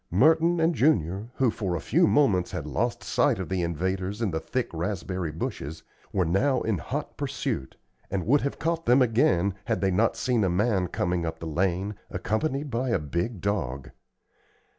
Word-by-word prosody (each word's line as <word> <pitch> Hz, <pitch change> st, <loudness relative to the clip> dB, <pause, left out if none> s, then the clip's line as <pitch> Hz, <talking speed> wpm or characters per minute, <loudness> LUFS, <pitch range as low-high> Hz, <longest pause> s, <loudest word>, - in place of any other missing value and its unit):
Merton 160 Hz, -, +4 dB
and 165 Hz, +1 st, +3 dB
Junior, 110 Hz, -, +1 dB
who 130 Hz, -4 st, +2 dB
for 95 Hz, -6 st, -2 dB
a -, -, -2 dB
few 170 Hz, -, +3 dB
moments 105 Hz, -12 st, +3 dB
had -, -, -5 dB
lost 120 Hz, +2 st, -1 dB
sight 140 Hz, -6 st, +2 dB
of 95 Hz, -, -5 dB
the 95 Hz, -1 st, 0 dB
invaders 95 Hz, +4 st, -2 dB
in 110 Hz, -5 st, 0 dB
the 80 Hz, -, -1 dB
thick 125 Hz, +9 st, -2 dB
raspberry 90 Hz, 0 st, -3 dB
bushes, 80 Hz, 0 st, -5 dB, 0.3 s
were 95 Hz, -2 st, +1 dB
now 125 Hz, +11 st, +2 dB
in 110 Hz, -6 st, 0 dB
hot -, -, -5 dB
pursuit, 65 Hz, -1 st, -3 dB, 0.3 s
and 95 Hz, -2 st, -2 dB
would 140 Hz, +6 st, +4 dB
have 140 Hz, -, -2 dB
caught 165 Hz, +1 st, -2 dB
them 125 Hz, +2 st, +6 dB
again, 100 Hz, -5 st, +2 dB
had -, -, 0 dB
they 95 Hz, -1 st, +1 dB
not 110 Hz, +5 st, +2 dB
seen 120 Hz, -4 st, +1 dB
a 95 Hz, -, +2 dB
man 95 Hz, 0 st, +1 dB
coming 90 Hz, 0 st, -1 dB
up 80 Hz, -1 st, -3 dB
the -, -, -8 dB
lane, 90 Hz, +5 st, 0 dB, 0.2 s
accompanied 135 Hz, +5 st, -2 dB
by 125 Hz, +2 st, -1 dB
a 115 Hz, -, +3 dB
big 85 Hz, -, -3 dB
dog. 70 Hz, -11 st, -2 dB
100 Hz, 185 wpm, -27 LUFS, 90-125 Hz, 0.3 s, them